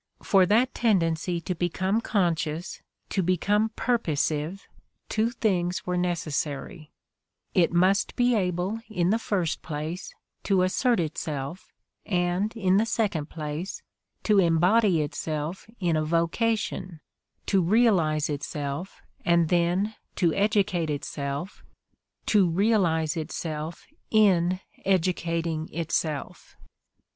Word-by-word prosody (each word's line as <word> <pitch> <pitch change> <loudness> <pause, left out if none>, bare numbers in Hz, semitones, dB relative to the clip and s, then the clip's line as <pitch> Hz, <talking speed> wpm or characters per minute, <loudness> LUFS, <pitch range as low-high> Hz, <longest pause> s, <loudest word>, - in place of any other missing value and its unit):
For 190 -3 +4
that 235 +6 +3
tendency 175 -5 +1
to 180 - -2
become 185 +5 0
conscious, 170 -6 -1 0.3
to 195 - 0
become 200 +5 +2
purposive, 165 - -1 0.4
two 220 +1 +1
things 180 -8 -1
were 180 - -1
neces 175 -4 -1
sary: 150 +3 -4 0.6
it 180 -4 +3
must 185 +4 +2
be 245 0 +3
able, 185 +1 0
in 180 -3 +1
the 225 - +2
first 180 -8 -1
place, 160 +3 -5 0.3
to 190 -2 +3
assert 235 +5 +2
itself 155 0 -4 0.3
and 180 +1 0
in 190 -3 +3
the 215 - +3
second 200 -9 -1
place 155 +4 -5 0.4
to 210 -2 +4
embody 175 +1 +4
itself 155 +4 -4
in 175 -4 +1
a 155 - +1
vocation; 175 +2 -1 0.5
to 195 -2 +2
realize 175 -6 +3
itself 145 +3 -5 0.2
and 170 -2 +3
then 180 +5 +1 0.2
to 170 -4 +2
educate 200 -5 +1
itself, 145 +3 -4 0.6
to 200 -5 +4
realize 170 -5 +2
itself 160 0 -5 0.2
in 185 -4 +3 0.2
educating 170 -3 0
itself. 155 -2 -3
175 Hz, 110 wpm, -26 LUFS, 160-200 Hz, 0.6 s, For